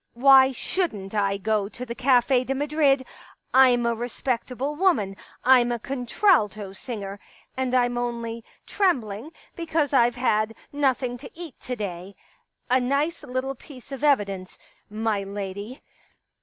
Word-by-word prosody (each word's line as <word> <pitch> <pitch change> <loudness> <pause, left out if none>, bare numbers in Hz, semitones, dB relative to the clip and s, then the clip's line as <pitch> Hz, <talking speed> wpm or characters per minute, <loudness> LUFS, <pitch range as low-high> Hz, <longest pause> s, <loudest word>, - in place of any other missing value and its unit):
Why 265 +1 +7
shouldn't 235 - -3
I 200 -2 +1
go 205 0 0
to 250 +3 -7
the 235 - -5
Cafe 250 0 +3
de 270 +1 -2
Madrid? 285 -2 +2 0.5
I'm 250 -2 +5
a 235 - +2
respectable 250 +3 -3
woman 295 - +1 0.2
— - - -28
I'm 240 -1 +3
a 240 - 0
con 250 +1 -5
tralto 210 - +2
singer. 200 -3 -6 0.4
And 260 -1 -1
I'm 245 -1 +2
only 235 -1 -4 0.2
trembling 255 - 0 0.3
because 320 -4 -1
I've 240 -2 +4
had 225 -3 +1 0.2
nothing 260 -3 0
to 270 - -10
eat 330 -5 -10
to 250 - -5
day.... 195 -3 -6 0.3
* - - -46
A 255 - +5
nice 280 +6 0
little 255 +2 -3
piece 270 0 -14
of 275 +1 -6
evidence, 200 -10 +1 0.3
my 215 -1 -1
lady. 200 +4 -6
245 Hz, 145 wpm, -25 LUFS, 215-270 Hz, 0.5 s, Why